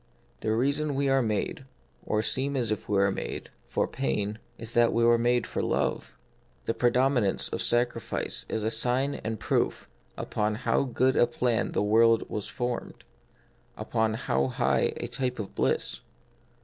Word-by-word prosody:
The 110 Hz, -, -1 dB
rea 130 Hz, +5 st, +3 dB
son 150 Hz, 0 st, -2 dB
we 140 Hz, 0 st, +1 dB
are 135 Hz, 0 st, +4 dB
made, 110 Hz, +3 st, -1 dB, 0.4 s
or 110 Hz, 0 st, +1 dB
seem 135 Hz, +4 st, 0 dB
as 120 Hz, -4 st, 0 dB
if 105 Hz, -, -3 dB
we 105 Hz, -, +2 dB
were 100 Hz, 0 st, +4 dB
made, -, -, -5 dB, 0.2 s
for -, -, 0 dB
pain, 100 Hz, +11 st, -2 dB, 0.2 s
is 115 Hz, +1 st, -5 dB
that 120 Hz, -1 st, +4 dB
we 115 Hz, -, +2 dB
are 120 Hz, 0 st, +5 dB
made 120 Hz, 0 st, +2 dB
for -, -, -3 dB
love; -, -, -1 dB, 0.5 s
the 115 Hz, -, 0 dB
predominance 125 Hz, -4 st, +2 dB
of -, -, -3 dB
sacrifice 120 Hz, -2 st, 0 dB
is 110 Hz, -, -2 dB
a 110 Hz, -, 0 dB
sign 125 Hz, +5 st, +1 dB
and 110 Hz, -1 st, -3 dB
proof -, -, 0 dB, 0.3 s
upon 105 Hz, 0 st, -1 dB
how 130 Hz, +4 st, +1 dB
good 130 Hz, +1 st, +2 dB
a 120 Hz, -, +5 dB
plan 120 Hz, -1 st, 0 dB
the -, -, +1 dB
world 115 Hz, +2 st, +4 dB
was 105 Hz, -, -3 dB
formed; 120 Hz, -1 st, -4 dB, 0.7 s
upon 110 Hz, 0 st, 0 dB
how 65 Hz, -, 0 dB
high -, -, +1 dB
a -, -, -4 dB
type 125 Hz, +1 st, -2 dB
of 105 Hz, -3 st, -6 dB
bliss. -, -, 0 dB
115 Hz, 170 wpm, -28 LUFS, 110-125 Hz, 0.7 s, are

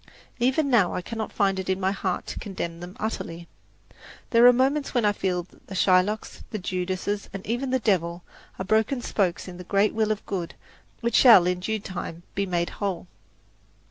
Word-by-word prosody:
Even 265 Hz, +5 st, +2 dB
now 205 Hz, -8 st, +3 dB
I 180 Hz, -, -3 dB
cannot 220 Hz, +2 st, -5 dB
find 195 Hz, -2 st, +1 dB
it 190 Hz, -, -4 dB
in 190 Hz, 0 st, +1 dB
my 190 Hz, 0 st, +1 dB
heart 190 Hz, -2 st, -2 dB
to -, -, -6 dB
condemn 170 Hz, -4 st, -5 dB
them 180 Hz, +2 st, -9 dB
utterly. 170 Hz, -6 st, -4 dB, 0.8 s
There 235 Hz, +1 st, +7 dB
are -, -, +10 dB
moments 270 Hz, +3 st, +1 dB
when 240 Hz, -3 st, +3 dB
I 205 Hz, -, +5 dB
feel 185 Hz, -3 st, -1 dB
that 175 Hz, -, -24 dB
the 195 Hz, -, -7 dB
Shylocks, 190 Hz, +3 st, +2 dB
the 215 Hz, -, -4 dB
Judases, 185 Hz, +2 st, -3 dB
and 195 Hz, -1 st, -7 dB
even 240 Hz, +4 st, -2 dB
the 260 Hz, -, +2 dB
Devil, 175 Hz, -7 st, 0 dB, 0.3 s
are 190 Hz, -, -4 dB
broken 220 Hz, +5 st, +1 dB
spokes 185 Hz, -4 st, -1 dB
in 180 Hz, -1 st, -8 dB
the 180 Hz, -, -8 dB
great 200 Hz, +3 st, +2 dB
wheel 220 Hz, -1 st, +1 dB
of 215 Hz, -, -3 dB
good 180 Hz, -4 st, -4 dB, 0.5 s
which 235 Hz, 0 st, -1 dB
shall 230 Hz, -9 st, +8 dB
in 180 Hz, 0 st, 0 dB
due 220 Hz, +4 st, -2 dB
time 175 Hz, -3 st, -6 dB
be 200 Hz, 0 st, -1 dB
made 175 Hz, -1 st, -1 dB
whole. 190 Hz, -4 st, -2 dB
195 Hz, 195 wpm, -25 LUFS, 180-220 Hz, 0.8 s, are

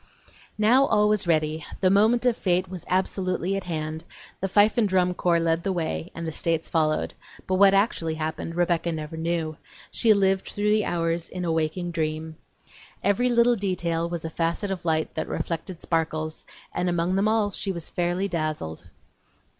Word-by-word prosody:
II -, -, -24 dB, 0.2 s
Now 240 Hz, +6 st, +5 dB
all 210 Hz, -1 st, +3 dB
was 210 Hz, -3 st, +1 dB
ready; 155 Hz, -1 st, +1 dB, 0.2 s
the 185 Hz, -1 st, +3 dB
moment 220 Hz, +5 st, +4 dB
of 245 Hz, -2 st, +4 dB
fate 185 Hz, -2 st, +1 dB
was 185 Hz, -2 st, -8 dB
absolutely 185 Hz, 0 st, 0 dB
at 195 Hz, -, -4 dB
hand; 155 Hz, -1 st, -4 dB, 0.4 s
the 195 Hz, -, -1 dB
fife 205 Hz, +2 st, +4 dB
and 215 Hz, -3 st, +2 dB
drum 180 Hz, -1 st, +2 dB
corps 175 Hz, -1 st, +2 dB
led 165 Hz, 0 st, +1 dB
the 195 Hz, -, -1 dB
way 170 Hz, -1 st, -2 dB
and 165 Hz, -, -5 dB
the 160 Hz, -, -3 dB
States 165 Hz, +1 st, -1 dB
followed; 155 Hz, -2 st, 0 dB, 0.3 s
but 185 Hz, -, 0 dB
what 195 Hz, 0 st, +6 dB
actually 170 Hz, -6 st, +1 dB
happened 160 Hz, +1 st, -4 dB
Rebecca 170 Hz, -1 st, +1 dB
never 155 Hz, 0 st, -5 dB
knew; 160 Hz, -1 st, -2 dB, 0.3 s
she 230 Hz, -, +3 dB
lived 195 Hz, -1 st, +2 dB
through 210 Hz, 0 st, 0 dB
the 215 Hz, -1 st, +3 dB
hours 165 Hz, -1 st, -1 dB
in 180 Hz, -1 st, -4 dB
a 165 Hz, -, 0 dB
waking 160 Hz, +2 st, -1 dB
dream. 155 Hz, -1 st, -3 dB, 0.7 s
Every 215 Hz, +6 st, +2 dB
little 240 Hz, 0 st, +4 dB
detail 170 Hz, -5 st, -1 dB
was 170 Hz, -2 st, -4 dB
a 160 Hz, -, -4 dB
facet 170 Hz, +5 st, -1 dB
of 185 Hz, -3 st, -4 dB
light 160 Hz, -1 st, 0 dB
that 160 Hz, -, -3 dB
reflected 170 Hz, +1 st, -4 dB
sparkles, 155 Hz, -1 st, -2 dB, 0.3 s
and 180 Hz, -, 0 dB
among 175 Hz, +1 st, 0 dB
them 195 Hz, +2 st, +2 dB
all 215 Hz, -2 st, +2 dB
she 195 Hz, 0 st, -2 dB
was 170 Hz, -3 st, -5 dB
fairly 175 Hz, +2 st, 0 dB
dazzled. 155 Hz, -, -4 dB
175 Hz, 185 wpm, -25 LUFS, 160-195 Hz, 0.7 s, what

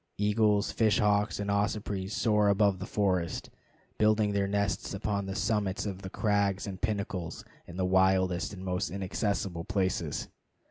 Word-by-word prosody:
Eagles, 105 Hz, 0 st, +2 dB
fish 110 Hz, -2 st, +2 dB
hawks, 105 Hz, 0 st, +2 dB
and 100 Hz, 0 st, -1 dB
ospreys 100 Hz, -1 st, -1 dB
soar 105 Hz, -3 st, +3 dB
above 100 Hz, -2 st, +3 dB
the 95 Hz, -, -5 dB
forest, 90 Hz, -7 st, -1 dB, 0.5 s
building 105 Hz, -1 st, +3 dB
their 100 Hz, -1 st, +1 dB
nests 100 Hz, 0 st, -1 dB
upon 100 Hz, 0 st, -2 dB
the 95 Hz, -, -4 dB
summits 105 Hz, -3 st, 0 dB
of 95 Hz, -2 st, -4 dB
the 95 Hz, -, -6 dB
crags 100 Hz, -2 st, 0 dB
and 95 Hz, -2 st, -7 dB
pinnacles 100 Hz, -6 st, -3 dB, 0.2 s
in 85 Hz, -, -9 dB
the 95 Hz, -, +1 dB
wildest 95 Hz, -1 st, +2 dB
and 95 Hz, -2 st, -8 dB
most 90 Hz, -1 st, -1 dB
inaccessible 95 Hz, -1 st, -2 dB
places. 95 Hz, -6 st, -1 dB
100 Hz, 150 wpm, -30 LUFS, 95-105 Hz, 0.5 s, soar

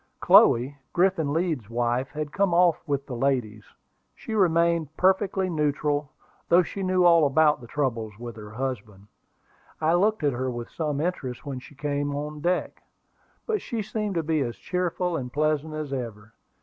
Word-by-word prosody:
Chloe, 130 Hz, +5 st, +5 dB, 0.2 s
Griffin 175 Hz, -5 st, +2 dB
Leeds's 160 Hz, -, -1 dB
wife, 120 Hz, +2 st, 0 dB
had 150 Hz, -1 st, -5 dB
come 195 Hz, -3 st, +1 dB
off 175 Hz, -2 st, +4 dB
with 140 Hz, -1 st, -1 dB
the 125 Hz, -, -6 dB
ladies. 120 Hz, -5 st, -1 dB, 0.5 s
She 225 Hz, -, -7 dB
remained 170 Hz, -5 st, +2 dB
perfectly 190 Hz, 0 st, +2 dB
neutral, 150 Hz, -3 st, 0 dB, 0.4 s
though 175 Hz, +2 st, +6 dB
she 195 Hz, -, -6 dB
knew 185 Hz, -1 st, +2 dB
all 170 Hz, -2 st, +6 dB
about 150 Hz, +1 st, +3 dB
the 120 Hz, -, -11 dB
troubles 115 Hz, -6 st, -2 dB
with 120 Hz, -1 st, -8 dB
her 105 Hz, -1 st, -10 dB
husband. 110 Hz, -4 st, -5 dB, 0.7 s
I 160 Hz, +1 st, +2 dB
looked 205 Hz, +1 st, +2 dB
at 145 Hz, -2 st, +2 dB
her 130 Hz, +2 st, -2 dB
with 120 Hz, -1 st, -6 dB
some 150 Hz, -3 st, -2 dB
interest 155 Hz, -7 st, -3 dB
when 135 Hz, -3 st, -4 dB
she 135 Hz, +3 st, -15 dB
came 145 Hz, 0 st, -2 dB
on 150 Hz, +1 st, -5 dB
deck; 180 Hz, +3 st, -1 dB, 0.6 s
but 435 Hz, -3 st, -1 dB
she 225 Hz, -3 st, -3 dB
seemed 210 Hz, -1 st, -3 dB
to 165 Hz, -, 0 dB
be 155 Hz, 0 st, 0 dB
as 120 Hz, -3 st, -2 dB
cheerful 180 Hz, -1 st, -2 dB
and 125 Hz, -5 st, -4 dB
pleasant 155 Hz, +2 st, 0 dB
as 150 Hz, -3 st, -4 dB
ever. 115 Hz, -4 st, -6 dB
150 Hz, 170 wpm, -26 LUFS, 130-175 Hz, 0.7 s, though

